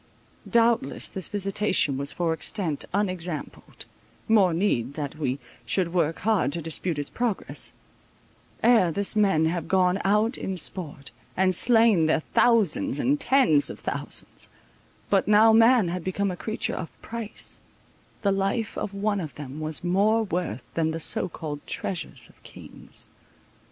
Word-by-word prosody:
Doubtless 235 -1 +1
this 190 -4 -5
visitation 195 -6 +1
was 140 +2 -1
for 170 -2 -1
extent 160 -3 0
unexampled—more 185 +2 -2
need 145 - 0
that 150 0 -5
we 135 -3 -1 0.3
should 180 -3 -1
work 165 -3 +1
hard 215 -7 +1
to 170 - -1
dispute 165 +1 -1
its 145 -1 -3
progress; 240 -5 -2 0.9
ere 225 -7 +5
this 200 +5 +1
men 195 -7 +3
have 165 0 -2
gone 185 +1 +2
out 210 +5 +2
in 190 -1 -4
sport, 155 -5 -4 0.3
and 185 0 +3
slain 225 -5 +4
their 160 0 +2
thousands 245 - +2
and 280 +3 +1
tens 260 - +4
of - - -8
thousands; - - -2 0.6
but - - +3
now 215 +2 +6
man 225 -3 +5
had 180 0 -4
become 190 +2 -1
a - - -4
creature 220 +5 -3
of 165 - -5
price; 230 -2 -6 0.6
the 200 - +3
life 195 +3 -1
of 200 - -5
one 205 0 0
of 160 -5 -6
them 145 0 -8
was 155 -1 0
of - - -7
more 205 +5 +2
worth 175 - -3
than 160 -1 0
the 160 +1 -3
so 180 - +1
called 150 -3 -6
treasures 160 -8 -3
of - - -24
kings. - - -10
185 Hz, 150 wpm, -25 LUFS, 160-215 Hz, 0.9 s, now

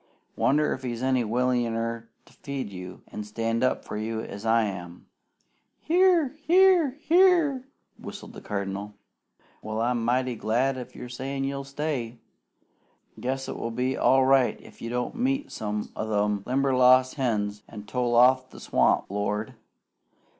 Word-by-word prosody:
Wonder 150 +2 +2
if 130 - -7
he's 120 -1 -4
any 130 -2 +2
willinger 115 -1 -1 0.2
to - - -21
feed 140 -7 -6
you 90 -1 -9
an' 105 - -6
stand 115 +3 -2
up 130 - 0
for - - -5
you 110 +1 -3
'an 105 0 -6
I 115 0 +4
am?" 90 -4 -6 0.7
"Here! 350 -3 +3 0.2
Here! 350 -6 +5
Here!" 330 -7 +3 0.3
whistled - - -9
the - - -10
Cardinal. 100 0 -4 0.7
"Well, 110 0 -4
I'm 120 0 0
mighty 125 +1 0
glad 120 +5 0
if 125 -2 -8
you're 125 - -7
sayin' 135 +3 -4
you'll 140 0 -3
stay! 140 -5 -3 1.0
Guess 135 +1 -3
it - - -5
will 115 - -3
be 125 +3 -1
all 130 0 +4
right 135 -1 +3
if - - -16
you 115 - -5
don't 125 0 -2
meet 270 +4 -1
some 105 -1 -4
o' 110 - -3
them 105 -1 0
Limberlost 130 -1 +4
hens 105 -6 -1
an' 105 -2 -9
tole 120 +2 -1
off 130 +2 +5
to - - -25
the - - -11
swamp. - - +2
Lord! 105 +2 -2
125 Hz, 155 wpm, -26 LUFS, 110-135 Hz, 1.0 s, Here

